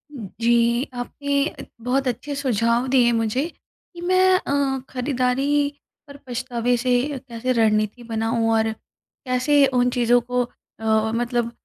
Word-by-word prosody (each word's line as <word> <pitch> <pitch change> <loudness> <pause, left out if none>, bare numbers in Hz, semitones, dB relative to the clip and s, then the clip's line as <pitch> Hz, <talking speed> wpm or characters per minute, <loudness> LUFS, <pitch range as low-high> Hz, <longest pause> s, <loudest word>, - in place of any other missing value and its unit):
उम, 225 -7 -7
जी, 235 +2 +3
आपने 280 +4 -2 0.3
बहुत 260 +2 0
अच्छे 285 +4 -3
सुझाव 240 -2 +1
दिए 250 -2 +4
मुझे, 230 +5 0 0.5
कि 345 - -10
मैं 370 +1 +4
अ, 275 -3 0
खरीदारी 265 +2 0 0.4
पर 280 0 -11
पछतावे 245 0 -1
से 250 +1 -1 0.3
कैसे 250 -1 -4
रणनीति 215 0 +1
बनाऊँ 225 +1 0
और 220 0 +2 0.5
कैसे 275 +3 +3
उन 245 0 +3
चीज़ों 245 0 +3
को 245 +1 -1
अ 235 - -20
अ, 220 0 +2
मतलब 240 0 -1
245 Hz, 135 wpm, -22 LUFS, 235-275 Hz, 0.5 s, दिए